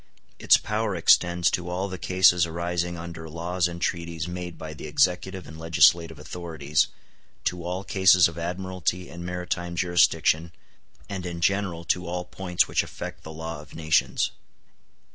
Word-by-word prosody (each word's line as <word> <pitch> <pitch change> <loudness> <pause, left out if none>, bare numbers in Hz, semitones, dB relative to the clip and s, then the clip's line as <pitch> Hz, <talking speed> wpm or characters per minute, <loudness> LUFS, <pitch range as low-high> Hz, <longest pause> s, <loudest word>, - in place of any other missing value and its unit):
Its - - +6
power - - -2
extends 85 0 +4
to 90 0 -2
all 90 +2 -2
the 95 -1 -7
cases 90 -2 +4
arising 85 +1 -2
under 80 -1 -8
laws 85 +2 -1
and 85 +1 -6
treaties 85 -1 -2
made 90 -1 -6
by 80 -1 -7
the 75 - -8
executive 90 +4 +1
and 80 +2 -10
legislative 80 0 +4
authorities, 75 -2 -1 0.6
to 90 -1 -2
all 90 +2 -3
cases 95 -2 +5
of 85 - -8
admiralty 90 +1 -3
and 85 0 -8
maritime 90 0 -3
jurisdiction, 85 -2 +2 0.6
and 95 -2 -5
in 85 -1 -5
general 90 -1 0
to 90 +1 -1
all 90 +1 -3
points 90 0 0
which - - +2
affect - - -7
the - - -10
law 80 0 -6
of 75 - -15
nations. 80 -1 +1
85 Hz, 155 wpm, -26 LUFS, 85-90 Hz, 0.6 s, Its